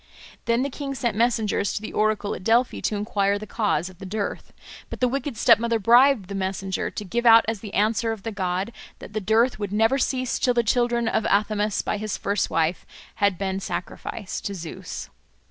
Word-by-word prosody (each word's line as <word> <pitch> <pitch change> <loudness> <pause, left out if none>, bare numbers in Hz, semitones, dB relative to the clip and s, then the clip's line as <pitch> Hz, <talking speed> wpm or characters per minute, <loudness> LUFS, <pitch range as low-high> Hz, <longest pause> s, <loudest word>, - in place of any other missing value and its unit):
Then 235 +2 +2
the 280 - -3
king 275 0 -5
sent 235 -4 -1
messengers 220 -3 +1
to - - -2
the - - -6
oracle 215 -1 0
at - - -7
Delphi 235 +4 +2
to 215 - -1
enquire 205 -1 0
the 210 - -7
cause 205 -7 0
of 185 -1 -13
the 195 - -8
dearth. 205 +1 -4 0.4
But - - -7
the 250 - +3
wicked 270 -1 -3
stepmother 230 0 +4
bribed 240 0 +5
the 200 - -6
messenger 190 0 -2
to 210 - -6
give 235 +5 -2
out 230 0 +8
as 225 -2 -2
the 210 -1 -8
answer 220 +2 +1
of 220 -3 -6
the 225 - -3
god 190 +2 -2 0.2
that - - -11
the 215 - -2
dearth 220 +4 +2
would 205 -2 -3
never 225 +6 +2
cease 255 -1 -1
till 250 -1 +2
the 235 - +3
children 240 +1 +1
of 220 0 0
Athamas 210 0 +1
by 215 - -1
his 215 0 -3
first 200 -1 -1
wife 165 +1 0 0.3
had 200 -4 +2
been 190 0 -2
sacrificed 195 +1 -5
to 200 - -3
Zeus. 165 -3 -7
215 Hz, 205 wpm, -24 LUFS, 200-235 Hz, 0.4 s, out